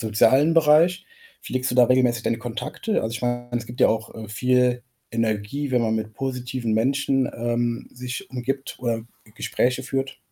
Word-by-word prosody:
sozialen 130 +8 +4
Bereich, 165 +3 +4 0.4
pflegst 130 +1 -2
du - - -2
da 125 -1 +7
regelmäßig 125 -1 +2
deine 115 - 0
Kontakte? 120 - -3
Also 110 +1 -3
ich - - -5
meine, 120 0 -1
es 120 -1 -2
gibt 120 +2 -9
ja - - +6
auch, 110 0 -2
äh, 110 -2 -8
viel 125 +2 +2 0.3
Energie, 115 +5 -1
wenn 125 -2 +2
man 110 -1 +1
mit 110 0 -3
positiven 125 -3 -3
Menschen, 135 +2 +1
ähm, 120 0 -1
sich 125 0 -6
umgibt 135 +2 -3
oder 115 -2 -1
G - - -19 0.3
Gespräche 125 +1 0
führt? 135 0 -3
125 Hz, 175 wpm, -24 LUFS, 115-130 Hz, 0.4 s, da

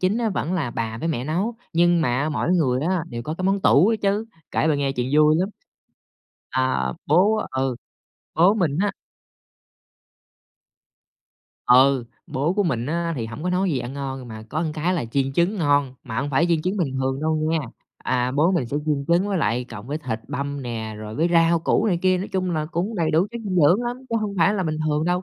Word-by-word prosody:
chính 190 +5 +1
á 230 -2 +1
vẫn 175 -2 -2
là 155 -9 -1
bà 115 -1 -3
với 165 - -2
mẹ 130 -6 -2
nấu, 185 +10 -1 0.2
nhưng 175 +1 +4
mà 140 +1 +1
mỗi 155 - -1
người 130 -7 +2
á 175 +1 0
đều 120 -1 -5
có 155 +6 -4
cái - - -3
món 195 +1 +2
tủ 190 - +5
ấy 225 - +2
chứ. 205 +2 0 0.3
Kể - - +1
bà 150 - +3
nghe 140 -1 0
chuyện 125 -1 -2
vui 155 0 +5
lắm. 185 +2 0 1.0
À, 130 - 0
bố 200 +8 +4
ừ, 130 -1 -1 0.6
bố 180 +5 +5
mình 170 -8 0
á 205 0 +1 2.7
ừ, 130 0 +5 0.2
bố 145 +7 -1
của 205 +1 +1
mình 125 -9 -1
á, 170 +2 -1
thì 115 -3 -3
hổng 115 +7 -8
có 180 - -1
nấu 185 +2 +1
gì 140 -9 0
ngon, 135 -2 -5
mà 110 -1 -8
có 155 +7 -2
cái 170 +4 0
là 165 - -1
chiên 135 +3 -1
trứng 175 +8 +1
ngon, 145 -5 +2
mà 115 -4 -6
hông 145 +1 -3
phải 160 +6 +3
chiên 165 -2 +1
trứng 185 +3 -1
bình 165 -9 -1
thường 135 +1 -1
đâu 155 0 +1
nghe. 165 0 +1 0.5
À, 125 0 0
bố 160 +5 +4
mình 165 -9 0
sẽ 140 - -3
chiên 145 -2 0
trứng 175 +4 +3
với 195 -2 0
lại 120 -1 0
cộng 115 -3 -10
với 145 +3 -3
thịt 125 -7 -4
băm 140 0 -4
nè, 110 -3 -5
rồi 110 0 -7
với 160 +6 +1
rau 165 0 +4
củ 185 +6 +1
này 180 -5 +1
kia, 185 -1 +3
nói 195 - -4
chung 185 -1 0
là 155 -3 -1
cũng 175 +7 -3
đầy 170 -5 0
đủ 165 +5 +3
chất 235 - -6
dinh 185 -3 -2
dưỡng 175 +8 +5
lắm 240 +1 -3
chứ 230 - +1
hông 205 -2 -3
phải 190 +5 +4
là 190 - 0
bình 155 -2 -2
thường 150 0 0
đâu. 180 +1 0
155 Hz, 225 wpm, -23 LUFS, 130-180 Hz, 2.7 s, tủ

